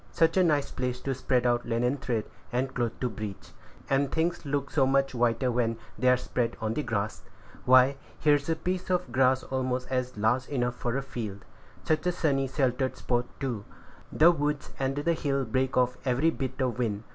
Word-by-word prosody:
Such 165 0 +3
a 185 - +5
nice 150 -5 +2
place 125 0 -2
to 135 - -1
spread 125 -1 0
out 120 0 +2
linen 125 +4 0
thread 120 -6 -2 0.3
and 130 +2 -1
cloth 120 -2 -2
to 125 - +1
bleach; 105 -5 -7 0.4
and 135 0 +1
things 165 -1 -1
look 140 -1 -1
so 135 -4 +3
much 135 0 +2
whiter 120 +1 +1
when 115 -1 0 0.2
they 130 - +2
are 125 - +5
spread 120 -2 -2
on 110 0 -1
the 150 - -1
grass! 110 -5 -2 0.4
Why, 130 +2 +6 0.2
here 150 0 +4
is 145 +1 0
a 165 - +2
piece 180 +3 -3
of 180 -1 0
grass 130 0 +3
almost 130 -1 -2 0.3
large 120 +5 +1
enough 125 -3 -1
for 120 +1 -2
a 135 - -2
field; 110 -7 -6 0.4
such 155 +3 0
a - - +3
sunny, 140 -6 +1
sheltered 130 -1 0
spot, 120 0 0
too! 125 -7 -3 0.5
the 165 +3 +6
woods 150 -3 -2
and 135 0 0
the 145 +4 +1
hill 140 -4 -1
break 130 +3 0
off 125 0 +2
every 135 +5 +2
bit 130 -3 -4
of 125 -2 -1
wind. 105 -3 -1
130 Hz, 195 wpm, -28 LUFS, 120-140 Hz, 0.5 s, Why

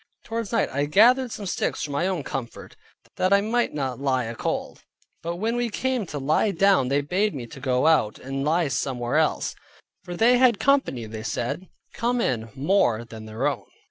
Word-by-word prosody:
Towards 230 -2 -4
night 230 -3 +1
I 140 +1 -1
gathered 240 - +4
some 205 - -6
sticks 180 - -2
for 150 - -4
my 145 +6 0
own 180 -6 -2
comfort, 125 -4 -6 0.4
that 185 - +1
I 200 0 +5
might 235 +3 0
not 135 -4 -3
lie 130 -2 +1
a 115 0 -5
cold; - - -4 0.4
but 170 +1 -3
when 220 +6 -1
we 240 -1 0
came 255 -2 -1
to 150 - -5
lie 150 +9 +2
down 195 -7 +3
they 140 +2 +1
bade 185 +6 0
me 125 -3 -5
to 115 - -11
go 130 0 +1
out, 155 -10 +3
and 135 +1 -4
lie 160 +2 +2
somewhere 125 -1 -1
else, 160 -1 +1 0.5
for 175 - -6
they 245 +4 +5
had 245 -5 +4
company 275 - +2
(they 110 0 -7
said) 120 +10 -3 0.2
come 240 +1 0
in 115 - -1
more 135 - +2
than 110 -1 -10
their 110 +4 -3
own. 145 -4 -1
155 Hz, 200 wpm, -24 LUFS, 130-210 Hz, 0.5 s, I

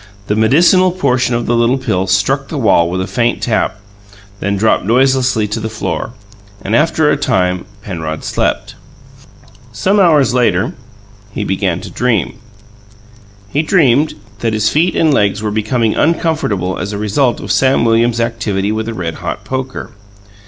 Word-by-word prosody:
The 105 - -1
medicinal 170 - +4
portion 130 -8 0
of 120 - -2
the 120 - +1
little 120 +3 +2
pill 95 -8 -1
struck 135 +9 +1
the 155 - -5
wall 100 -9 +3
with 90 +1 -2
a - - -2
faint 120 +2 0
tap, 110 -2 0 0.6
then 100 0 -1
dropped 110 +3 +2
noiselessly 125 0 +2
to 105 - -3
the 110 - -4
floor, 110 +1 -4 0.5
and, 105 +3 -1
after 155 0 +2
a - - +1
time, 95 -10 0 0.2
Penrod 80 -6 -5
slept. - - -2 1.0
Some 200 +2 +1
hours 150 -9 +4
later 125 -2 +1 0.6
he 105 - -4
began 95 -3 -1
to - - -9
dream; 120 -6 -1 1.1
he 145 +8 0
dreamed 150 -4 +2 0.2
that 115 -1 -1
his 110 0 +1
feet 170 +4 +1
and 160 -2 +3
legs 105 -3 +1
were 105 - -1
becoming 110 +1 0
uncomfortable 155 - 0
as 100 +3 -4
a - - -3
result 120 +5 0
of 100 - -5
Sam 130 +5 +2
Williams's 115 +1 +2
activities 105 -3 -1
with 110 0 -3
a 115 - -4
red 85 -4 -3
hot - - -4
poker. 130 0 -5
115 Hz, 160 wpm, -15 LUFS, 100-135 Hz, 1.1 s, medicinal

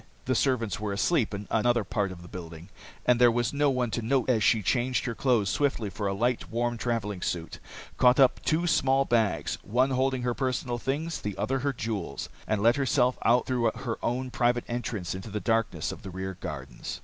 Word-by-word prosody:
The 130 - +1
servants 115 - +1
were 105 -1 -3
asleep 115 - +1
in 100 0 -6
another 120 0 +2
part 100 -1 -1
of 85 -2 -10
the - - -11
building, 85 0 -9 0.4
and 125 0 +3
there 120 - +8
was 120 +2 0
no 145 0 +3
one 125 -3 0
to 120 - -1
note 130 +2 +1
as 110 -4 +2
she 110 -3 +3
changed 125 +6 +1
her 120 - -2
clothes 120 -5 +2
swiftly 125 -8 0
for 100 +2 -3
a 100 - 0
light, 120 +4 0
warm 120 +1 -1
travelling 110 -5 -2
suit, 85 -2 -3 0.4
caught 125 +1 +5
up 135 -2 +4
two 165 +2 +1
small 135 -4 +3
bags, 115 -5 0
one 125 +6 +1
holding 130 -1 +1
her 125 -1 0
personal 125 -2 -2
things, 155 +7 -2
the 105 -2 -4
other 130 +6 0
her 140 +2 0
jewels, 105 - -4 0.2
and 105 -1 0
let 120 +4 +5
herself 130 -2 +2
out 120 +2 +4
through 120 -3 +1
her 115 -3 -4
own 125 +2 -2
private 120 -1 +1
entrance 120 -7 -3
into 95 +4 -7
the 105 +1 -3
darkness 115 0 0
of - - -9
the 95 - -8
rear 95 +1 -5
gardens. 65 -6 -6
120 Hz, 210 wpm, -28 LUFS, 105-130 Hz, 0.4 s, there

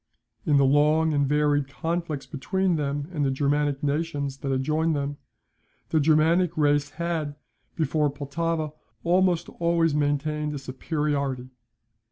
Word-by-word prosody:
In 145 -2 +4
the 140 - +5
long 150 +3 +3
and 145 -1 +2
varied 145 -1 +2
conflicts 155 +3 -3
between 185 +5 -1
them 145 -1 -2
and 150 -3 0
the 135 - +2
Germanic 145 +1 0
nations 145 -2 -1
that 140 0 -3
adjoin 155 +5 +1
them, 145 0 -2 0.7
the 160 - +2
Germanic 160 +3 +3
race 145 -1 +2
had, 155 -1 -3 0.4
before 155 -1 +1
Pultowa, 155 +2 -2 0.3
almost 175 -1 +2
always 170 -2 +2
maintained 150 +1 0
a - - -3
superiority. 140 -1 -2
150 Hz, 130 wpm, -25 LUFS, 140-160 Hz, 0.7 s, the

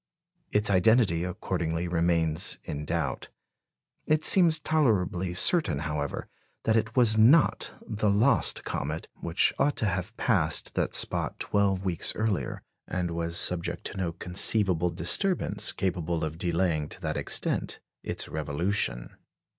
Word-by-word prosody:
Its 105 0 +2
identity 95 -2 +3
accordingly 90 -2 -3
remains 85 -1 +1
in 75 +1 -6
doubt. 75 -5 -3 0.8
It 155 0 +2
seems 170 -4 +6
tolerably 95 - 0
certain, 100 - +2
however, 75 -1 -4 0.4
that 110 - +1
it 115 0 -1
was 110 -4 +4
not 135 +8 +4 0.2
the 105 -1 -1
lost 115 +6 +2
comet, 80 +3 -5
which 85 +2 +1
ought 145 +1 +1
to - - 0
have 95 +3 -3
passed 90 -9 0
that - - -1
spot - - +1
twelve 100 -2 0
weeks 90 -3 -1
earlier, 110 -3 -3 0.2
and 90 -1 -3
was 85 0 -3
subject 85 -2 +1
to - - -10
no 90 -3 -2
conceivable 90 0 +2
disturbance 175 - +2
capable 85 -3 -3
of 80 +1 -5
delaying 85 -3 -1
to - - -7
that - - -3
extent - - -1 0.2
its - - -2
revolution. 80 -3 -2
90 Hz, 130 wpm, -27 LUFS, 85-110 Hz, 0.8 s, seems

